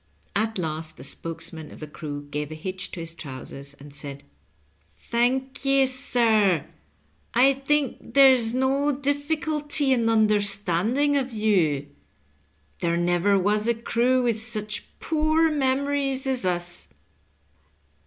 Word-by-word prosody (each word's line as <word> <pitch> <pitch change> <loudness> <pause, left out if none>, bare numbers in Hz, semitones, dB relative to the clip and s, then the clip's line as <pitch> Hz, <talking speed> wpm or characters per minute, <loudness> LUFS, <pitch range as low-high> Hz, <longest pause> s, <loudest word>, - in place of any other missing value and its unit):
At 220 +1 0
last 160 -2 -4
the 130 - -10
spokesman 165 +1 -7
of - - -12
the 155 - -6
crew 145 -1 -7
gave 150 0 -3
a - - -5
hitch 185 +4 -5
to - - -5
his 165 0 -6
trousers, 140 -2 -9
and 140 0 -14
said, 140 -1 -7 0.4
" - - -39 0.2
Thank 260 +4 0
ye, 275 -1 +4
sir; 225 - +2 0.7
I 265 +3 +6
think 275 0 -1
there's 260 -5 +6
no 270 +3 +1
difficulty 290 0 0
in 230 -3 +2
understanding 215 +5 +2
of 260 -2 -2
you. 180 -10 +2 0.9
There 170 0 0
never 175 +3 +2
was 210 +3 +1
a 235 - +2
crew 245 +3 +1
with 230 -3 0
such 215 -2 -4
poor 315 +1 +2
memorieff 275 -1 0
aB 260 -5 -1
us." 175 0 -4
225 Hz, 130 wpm, -25 LUFS, 170-270 Hz, 0.9 s, I